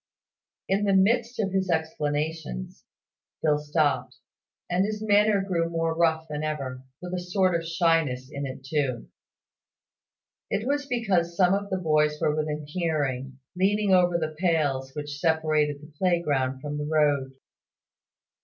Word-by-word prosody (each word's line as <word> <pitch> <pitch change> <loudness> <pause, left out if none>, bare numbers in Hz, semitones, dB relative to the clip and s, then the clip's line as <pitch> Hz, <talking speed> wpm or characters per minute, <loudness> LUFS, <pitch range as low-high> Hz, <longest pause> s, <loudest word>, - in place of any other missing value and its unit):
In 200 +2 +1
the 195 -1 +3
midst 230 +5 +2
of 195 -3 0
his 190 -1 0
explanations 155 - -2 0.6
Phil 150 -2 +3
stopped, 150 -2 0 0.5
and 180 +1 +1
his 210 +1 -3
manner 210 -1 +4
grew 170 -4 0
more 165 -1 -1
rough 160 -1 +2
than 150 -1 -4
ever 135 -5 -3 0.2
with 180 0 -5
a 180 - -1
sort 185 +1 +1
of 165 -1 0
shyness 165 -6 +1
in 140 -1 -4
it 130 0 -8
too. 135 -4 -1 1.4
It 215 - -1
was 285 +1 -1
because 190 -9 0
some 180 -1 +4
of 200 0 -1
the 190 - 0
boys 150 -3 +2
were 150 - +1
within 150 -1 -2
hearing, 145 -6 -2 0.2
leaning 200 +2 +2
over 175 -1 +4
the 155 -2 -3
pales 145 -7 +1
which 145 -1 -5
separated 155 -3 +1
the 150 0 -14
playground 145 -8 +1
from 150 0 -4
the 150 - -3
road. 145 -4 +2
160 Hz, 145 wpm, -26 LUFS, 150-185 Hz, 1.4 s, manner